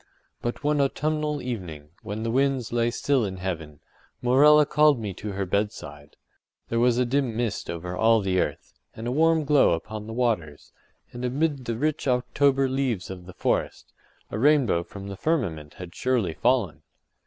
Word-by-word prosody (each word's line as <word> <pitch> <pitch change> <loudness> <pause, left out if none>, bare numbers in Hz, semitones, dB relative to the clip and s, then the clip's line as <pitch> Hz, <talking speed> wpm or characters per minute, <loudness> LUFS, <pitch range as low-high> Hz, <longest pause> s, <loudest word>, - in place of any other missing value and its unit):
But 120 +4 -4
one 150 0 +2
autumnal 150 +1 -1
evening, 90 -12 -6
when 105 +2 -5
the 115 - -1
winds 130 -2 0
lay 120 0 +2
still 130 +1 +1
in 95 -2 -4
heaven, 80 -5 -5 0.4
Morella 145 +5 +6
called 150 -2 +4
me 105 -3 -4
to 100 +2 -6
her 100 0 -2
bedside. 90 -7 -4 0.5
There 115 - 0
was 120 0 +3
a 125 - +2
dim 125 -2 0
mist 115 -4 -2
over 90 +1 -5
all 115 +3 +4
the 95 -2 0
earth, - - -3 0.2
and 110 - -7
a 120 - -1
warm 160 +3 +3
glow 145 - +4
upon 105 +6 -5
the 110 - -6
waters, 110 -12 -2 0.4
and 120 0 -7
amid 140 +1 -1
the 115 -1 -2
rich 150 +2 -1
October 135 +2 +2
leaves 130 -8 -2
of 90 -1 -9
the 90 - -10
forest, - - -2 0.4
a 105 - -3
rainbow 135 - +3
from 100 +3 -10
the 100 - -6
firmament 90 - -2
had 90 -2 -9
surely 120 -10 0
fallen. 115 -4 +1
120 Hz, 175 wpm, -25 LUFS, 95-135 Hz, 0.5 s, Morella